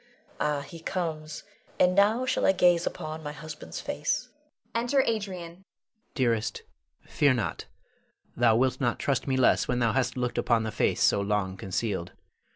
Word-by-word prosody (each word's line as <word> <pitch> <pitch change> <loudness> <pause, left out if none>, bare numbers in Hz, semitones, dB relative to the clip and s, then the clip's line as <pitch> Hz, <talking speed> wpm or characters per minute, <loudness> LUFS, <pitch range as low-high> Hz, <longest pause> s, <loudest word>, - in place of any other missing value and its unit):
Ah, 150 -1 0
he 165 +4 -10
comes; 160 -3 -4 0.4
and 180 0 +5
now 210 +6 +3
shall - - 0
I - - +5
gaze 175 -2 +3
upon 155 -2 -5
my 150 -1 -5
husband's 150 +1 -8
face! - - -2 0.4
[Enter 245 +4 +2
Adrian. 230 - +2 0.4
Adrian. 185 +3 -21 0.5
Dearest, 115 -5 0 0.4
fear 140 -3 +2
not. 120 - -3 0.7
Thou 120 -2 +4
wilt 130 +4 +1
not 120 -2 +1
trust 140 -1 -1
me 130 -1 +1
less 130 - +3
when 125 - 0
thou 115 -2 +2
hast 130 -2 0
looked 125 -1 -1
upon 115 -2 +2
the 110 - -3
face - - +1
so 100 - +4
long 100 -2 -1
concealed. 95 -1 -3
140 Hz, 160 wpm, -28 LUFS, 115-170 Hz, 0.7 s, and